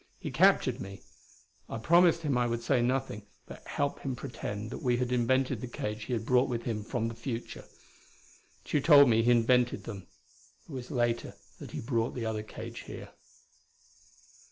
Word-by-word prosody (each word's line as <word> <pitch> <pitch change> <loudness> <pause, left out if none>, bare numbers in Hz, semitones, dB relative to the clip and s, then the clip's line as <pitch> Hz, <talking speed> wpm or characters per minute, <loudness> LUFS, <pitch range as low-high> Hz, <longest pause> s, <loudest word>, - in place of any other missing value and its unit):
He - - -6
captured - - +3
me. 95 0 -9 0.7
I - - -4
promised 170 +6 +4
him 145 -4 0
I 120 0 +2
would 120 0 -2
say 125 +1 +2
nothing, 120 -4 -1 0.2
but - - -11
help 145 0 -1
him 135 -2 -3
pretend 110 -4 -6
that - - -6
we 125 -1 +1
had 125 0 -1
invented 130 0 +1
the 125 - -4
cage 105 -2 -5
he 125 - -3
had 110 -2 -2
brought 125 +2 +3
with 120 -1 -2
him 110 -3 -3
from 115 0 -2
the 115 - -4
future. 115 0 -6 1.0
Tugh 145 - 0
told 145 -4 +8
me 115 -1 +4
he 120 - +2
invented 120 +1 +3
them. 100 -5 -8 0.6
It - - -13
was 130 -3 -6
later 120 -4 -1 0.2
that - - -8
he - - -5
brought 115 -1 -1
the 120 -3 -3
other 110 -1 -2
cage 110 - -8
here. - - -8
120 Hz, 180 wpm, -30 LUFS, 115-130 Hz, 1.0 s, told